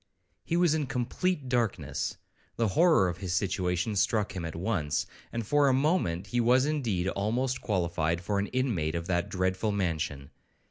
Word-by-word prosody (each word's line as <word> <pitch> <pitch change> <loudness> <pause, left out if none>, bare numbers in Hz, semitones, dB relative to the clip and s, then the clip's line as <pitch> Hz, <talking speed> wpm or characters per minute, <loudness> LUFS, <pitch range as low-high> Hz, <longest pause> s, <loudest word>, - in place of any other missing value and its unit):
He 170 - -1
was 175 -3 +4
in 155 -3 0
complete 140 +5 -1
darkness; 120 -4 -1 0.4
the 115 -2 +1
horror 160 - +4
of 90 0 -4
his 95 -2 -2
situation 90 +1 0
struck 105 +1 +1
him 90 -3 -3
at 80 - -5
once, 85 -6 -1 0.3
and 115 -1 -3
for 145 +5 +3
a 135 - +4
moment 135 - +1
he 120 +4 -1
was 125 +3 +4
indeed 120 -12 0
almost 120 +7 -1
qualified 85 -4 0
for 100 +3 -1
an 100 - -1
inmate 110 - -1
of 85 0 -3
that 85 -1 0
dreadful 95 +3 0
mansion. 80 -8 -2
100 Hz, 170 wpm, -29 LUFS, 90-130 Hz, 0.4 s, was